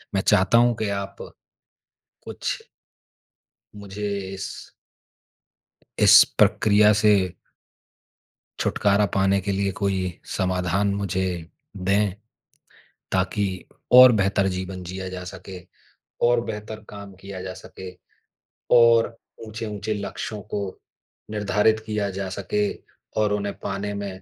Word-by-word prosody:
मैं 95 - +2
चाहता 95 +4 +4
हूँ 120 0 +4
कि 110 - -2
आप 100 0 -4 1.1
कुछ - - -5 1.1
मुझे 105 0 -6 0.3
इस 95 0 -7 1.3
इस - - +9 0.2
प्रक्रिया 105 0 +5
से 100 -4 +3 1.3
छुटकारा 100 0 +2
पाने 95 0 +2
के 100 +1 -2
लिए 100 0 0
कोई 100 -1 +1 0.4
समाधान 95 +2 0
मुझे 100 -2 -1 0.5
दें, 100 +1 +1 1.0
ताकि 95 +2 0 0.5
और 130 0 +10
बेहतर 100 -2 +1
जीवन 95 0 -5
जिया 95 +1 -6
जा 90 0 -7
सके, 95 0 -9 0.7
और 120 0 +3
बेहतर 110 0 -7
काम 100 -1 -10
किया 95 -1 -8
जा 95 - -6
सके, 95 -1 -10 0.8
और 115 -1 +5 0.3
ऊँचे-ऊँचे 110 -1 -4
लक्ष्यों 105 +1 -5
को 105 - -1 0.7
निर्धारित 105 +1 +2
किया 105 -2 -2
जा 95 0 -4
सके 105 +1 0 0.5
और 105 -1 +1
उन्हें 100 0 -2
पाने 100 +1 -3
में 100 -2 -6
100 Hz, 110 wpm, -24 LUFS, 95-105 Hz, 1.3 s, और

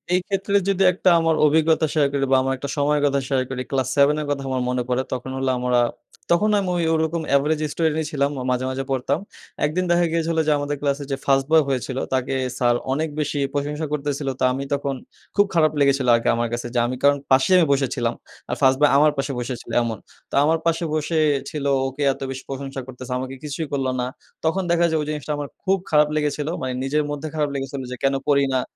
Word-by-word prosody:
এইক্ষেত্রে 195 +2 -1
যদি 195 0 +2
১ 180 - -9
টা - - +8
আমার 165 -1 +2
অভিজ্ঞতা 160 +1 +3
শেয়ার 150 -3 +3
করি 140 -1 +1
বা - - +6
আমার 135 - 0
একটা 140 +1 -6
সময়ের 145 +1 +2
কথা 140 -1 +2
শেয়ার 130 -2 +1
করি; 130 -1 -4
ক্লাস 130 -2 0
7 140 +1 +4
এর - - -4
কথা 140 -1 -2
আমার 130 -1 -1
মনে 125 -1 0
পড়ে। 125 +1 +1
তখন 130 +1 -4
হলো 135 0 0
আমরা, 125 0 +1 0.5
তখন 210 +5 +3
আমি 190 -2 -2
ঐ - - -1 0.2
ওরকম 160 +1 0
এভারেজ 150 +2 +2
স্টুডেন্টই 160 -1 0
ছিলাম। 140 -1 +1 0.2
মাঝে, 125 0 0
মাঝে 135 +1 -3
পড়তাম। 135 +4 0 0.5
১ 150 - +1
দিন 185 - +1
দেখা 175 0 +4
গিয়েছিলো 165 0 0
যে - - +4
আমাদের 145 0 -2
ক্লাসে 140 0 -1
যে - - +1
ফার্স্ট 135 -1 +3
বয় 160 -1 +6
হয়েছিলো 130 0 -2
তাকে 130 +1 0 0.2
স্যার 120 -1 +3 0.2
অনেক 155 +2 -1
বেশি 145 -1 -1
প্রশংসা 150 +2 -2
করতেছিলো। 145 -1 -2
তো - - -1
আমি 135 +2 -3
তখন 140 -1 -1 0.4
খুব 205 0 +5
খারাপ 155 -3 +4
লেগেছিলো 140 -2 +3
আরকি 115 - 0
আমার 120 0 0
কাছে, 120 0 -3
যে 120 - +3
আমি 130 - -3
কারণ 145 0 +5
পাশে 130 +7 +4
আমি 175 - +5
বসেছিলাম। 135 -2 0 0.4
আর - - -1
ফার্স্ট 130 0 +5
বয় 150 - +5
আমার 150 +1 +5
পাশে 135 +1 -1
বসেছিলো 120 0 -5
এমন। 115 -3 -3 0.3
তো - - -5
আমার 160 +2 +3
পাশে 165 0 +1
বসে 155 +1 -1 0.3
ছিল 150 -3 -5 0.2
ওকে 135 +2 -7
এত - - -16
বেশি 130 0 -7
প্রশংসা 135 0 -5
করতেছে, 130 0 -9
আমাকে 130 +1 -5
কিছুই 150 +1 -4
করলো 135 -2 0
না। 125 - 0 0.4
তখন 185 +4 +1
দেখা 170 0 +3
যায় 160 - +1
ঐ - - -1
জিনিসটা 150 0 -4
আমার 145 -1 -4 0.2
খুব 195 0 +2
খারাপ 150 -1 +4
লেগেছিলো। 150 0 -1
মানে 130 -1 -2
নিজের 150 +3 +1
মধ্যে 145 +1 -4
খারাপ 150 -2 0
লেগেছিলো 135 0 -4
যে - - -3
কেন 135 0 +3 0.2
পড়ি 140 -1 +4
না 130 - +2
140 Hz, 220 wpm, -22 LUFS, 135-155 Hz, 0.5 s, টা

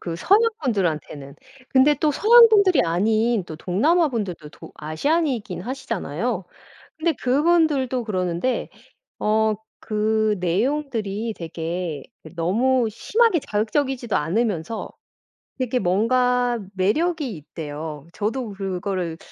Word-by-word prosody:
그 170 -2 -5
서양 395 - +4 0.2
분들한테는 155 - -2 0.3
근데 270 +3 +4
또 300 +2 +1
서양 465 - +7
분들이 400 -5 +4
아닌 215 +5 +1
또 160 - -8
동남아 300 - +2
분들도 195 - -4
도 - - -13
아시안이긴 220 - -1
하시잖아요. 220 - -3 0.5
근데 325 +1 +1
그분들도 275 -2 +2
그러는데 185 +3 -1 0.5
어 215 0 +2 0.3
그 215 0 +1
내용들이 220 - -1
되게 165 -2 -4 0.3
너무 230 +9 +2
심하게 445 - +2
자극적이지도 240 +2 -1
않으면서 195 +3 -1 0.7
되게 255 0 0
뭔가 245 +5 +2 0.2
매력이 275 - 0
있대요. 150 -1 -7
저도 225 +2 -3
그거를 185 -3 -3
220 Hz, 260 characters per minute, -23 LUFS, 180-265 Hz, 0.7 s, 서양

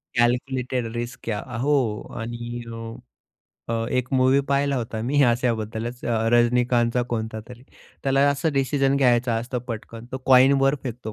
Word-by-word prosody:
Calculated 125 +1 0
risk 120 +1 -5
घ्या. 105 -3 -2
अ, 120 0 -7
हो 130 -5 +1 0.2
आणि 120 +1 -5
अ, - - -6 1.0
अ, 115 0 -1
1 125 0 -2
मूव्ही 130 +1 +4
पाहिला 140 0 +1
होता 115 -2 -4
मी 140 +5 +2
अशाबद्दलच 120 -1 -1
अ, 115 -1 0
रजनीकांतचा 120 0 +3
कोणता 110 -1 -3
तरी, 125 0 -12 0.4
त्याला 135 +1 +3
असं 140 +3 -1
डिसिजन 135 0 +1
घ्यायचा 125 -3 +3
असतो 120 +2 -3
पटकन. 115 0 -7
तो 130 - -3
कॉइनवर 135 +1 +5
फेकतो 120 -3 -6
120 Hz, 145 wpm, -24 LUFS, 115-135 Hz, 1.0 s, कॉइनवर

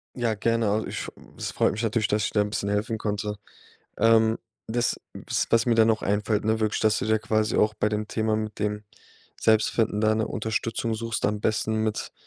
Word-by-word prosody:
Ja, 120 -3 0
gerne, 115 +1 +1
also, 110 +1 0
ich - - -4 0.3
es - - -4
freut - - +2
mich 110 +3 -4
natürlich, 110 -1 +1
dass 105 0 +1
ich - - -2
da 105 - +2
'n 105 - -1
bisschen 100 -1 -2
helfen 105 +2 -1
konnte. 105 0 -2 0.6
Ähm, 110 0 +4 0.3
das 120 +1 0
w - - -10 0.3
was 115 +1 +3
mir 120 - +3
da 110 -1 +5
noch 110 -1 +1
einfällt, 105 +1 0
ne, 110 +1 +1
wirklich, 110 -1 0
dass 110 -1 +3
du - - -2
da 110 0 +3
quasi 110 +1 0
auch 105 0 +3
bei 105 - +1
dem 105 0 -2
Thema 110 0 0
mit 110 -1 -4
dem 105 0 -2 0.6
Selbstfinden 110 -1 +2
da 110 0 +3
'ne 110 0 -1
Unterstützung 115 +1 -2
suchst, 115 0 -3
am 105 0 -1
besten 110 +1 0
mit 110 -1 -2
110 Hz, 210 wpm, -26 LUFS, 105-110 Hz, 0.6 s, da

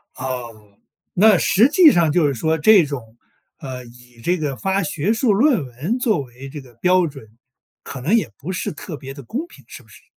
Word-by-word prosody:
啊， 130 0 -5 0.9
那 205 0 +5
实 225 +10 +3
际 310 +1 +7
上 170 - +2
就 155 -1 +3
是 140 - -1
说 160 +6 0
这 195 +4 +6
种， 120 -6 -8 0.4
呃， 130 -3 -7
以 120 0 -18
这 180 +6 +1
个 145 -4 -3
发 195 +6 -1
学 165 +6 -1
术 225 -1 +2
论 230 - +2
文 145 - -4
作 225 - +1
为 130 +1 -11
这 145 +1 -8
个 125 -2 -18
标 180 +8 +2
准， 135 -6 -11 0.6
可 130 - -8
能 170 - +2
也 230 - +1
不 165 +6 -6
是 180 - -3
特 155 +1 -8
别 135 -1 -9
地 140 - -10
公 260 - -4
平， - - -18
是 - - -12
不 - - -25
是？ - - -17
155 Hz, 225 characters per minute, -20 LUFS, 130-200 Hz, 0.9 s, 际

